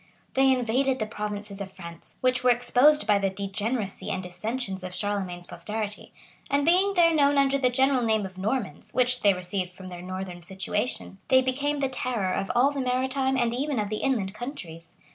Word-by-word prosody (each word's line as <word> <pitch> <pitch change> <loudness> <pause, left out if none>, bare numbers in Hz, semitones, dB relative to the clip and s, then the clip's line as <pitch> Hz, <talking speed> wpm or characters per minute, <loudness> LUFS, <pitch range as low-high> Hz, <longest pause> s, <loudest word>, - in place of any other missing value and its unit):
[*] - - -37
They 270 0 +4
invaded 255 +2 +1
the 215 - -1
provinces 210 -1 -5
of 195 -1 -6
France, 170 -3 -11
which 255 0 +2
were 250 - +5
exposed 250 +3 +4
by 205 -1 +4
the 195 -1 +1
degeneracy 200 +2 -3
and 185 - -2
dissensions 190 +2 -4
of 185 0 -6
Charlemagne's 190 -4 -2
posterity; 210 +2 -5 0.4
and 280 0 +2
being 375 +4 +3
there 335 -2 +5
known 285 -2 +4
under 275 0 +3
the 255 -2 +3
general 265 +1 +3
name 220 -3 +1
of 190 -1 -9
Normans, 210 - -3
which 250 0 +2
they 200 - +6
received 180 0 -3
from 185 +1 -11
their 175 -1 -8
northern 185 -1 -6
situation, 195 +3 -3
they 260 0 +5
became 285 +3 -1
the 270 - +2
terror 245 -7 -2
of 195 - -2
all 260 +4 +4
the 280 -1 -3
maritime 260 +1 0
and 240 -2 +1
even 275 +2 -1
of 210 -2 -1
the 215 - -2
inland 215 -8 0
countries. 205 - -8
225 Hz, 195 wpm, -26 LUFS, 195-265 Hz, 0.4 s, they